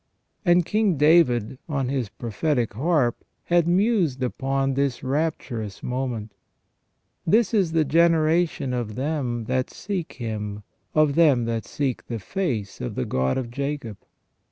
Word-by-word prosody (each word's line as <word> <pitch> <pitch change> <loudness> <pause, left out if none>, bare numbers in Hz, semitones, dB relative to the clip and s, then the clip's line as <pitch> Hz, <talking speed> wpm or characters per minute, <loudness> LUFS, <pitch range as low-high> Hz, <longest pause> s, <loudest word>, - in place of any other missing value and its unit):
And 175 -2 +4
King 210 -5 +1
David, 135 -6 +4
on 135 -4 -1
his 130 -6 -1
prophetic 120 +2 -1
harp, 130 -1 +1 0.2
had 170 -1 +2
mused 175 - +2
upon 135 +2 0
this 140 -2 -1
rapturous 130 -7 -2
moment: 125 -4 -3 0.3
— - - -49
" - - -36
This 235 -1 +1
is 190 -7 +2
the 160 -2 +3
generation 160 -2 +2
of 115 -4 -3
them 130 -4 -2
that 130 +3 -1
seek 185 -4 -4
Him; 105 -3 -5 0.3
of 155 -2 +4
them 140 -7 +4
that 115 -1 -2
seek 135 -4 -3
the 115 - -3
face 115 - -3
of 60 - -4
the 65 - -1
God 65 0 0
of 120 -3 -3
Jacob. 140 -5 -4
135 Hz, 145 wpm, -24 LUFS, 120-165 Hz, 0.3 s, And